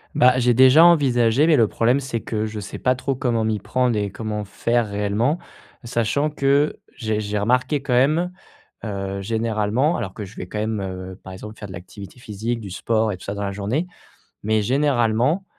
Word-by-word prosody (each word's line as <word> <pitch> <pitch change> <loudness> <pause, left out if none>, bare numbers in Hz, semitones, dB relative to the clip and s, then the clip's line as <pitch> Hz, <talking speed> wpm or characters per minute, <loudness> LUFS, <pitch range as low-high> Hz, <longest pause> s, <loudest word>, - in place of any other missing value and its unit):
Bah, 125 0 +5
j'ai 120 -1 +3
déjà 130 +5 +7
envisagé 130 -5 +4
mais 160 -2 +5
le 115 -5 +4
problème 120 +6 +2
c'est 130 -4 -3
que 110 -1 -3
je 110 0 -6
sais 105 - -7
pas 125 0 +2
trop 135 +2 -2
comment 120 -3 0
m'y 110 -1 0
prendre 125 +3 0
et 105 -1 -1
comment 105 +1 -4
faire 115 +3 -1
réellement. 105 +9 0 0.5
Sachant 120 +5 0
que 140 +1 +1 0.2
j'ai 110 -3 -2
j'ai 105 0 -3
remarqué 125 +7 +1
quand 125 - -1
même, 155 +8 +3 0.5
heu, 100 -2 -4
généralement 110 - 0
alors 95 -5 -5
que 105 - -6
je 100 - -14
vais 90 - -7
quand 105 - -6
même, 110 -1 -1
heu, 95 0 -6
par 95 - -9
exemple 105 +3 -9
faire 105 - -7
de 95 - -10
l'activité 100 +6 -11
physique 115 +1 -4
du 100 -4 -8
sport 110 +3 0
et 95 - -5
tout - - -14
ça 100 - -4
dans 100 - -4
la 100 - -2
journée, 105 - -2 0.6
mais 110 0 +2
généralement, 130 - +1
115 Hz, 200 wpm, -22 LUFS, 105-130 Hz, 0.6 s, déjà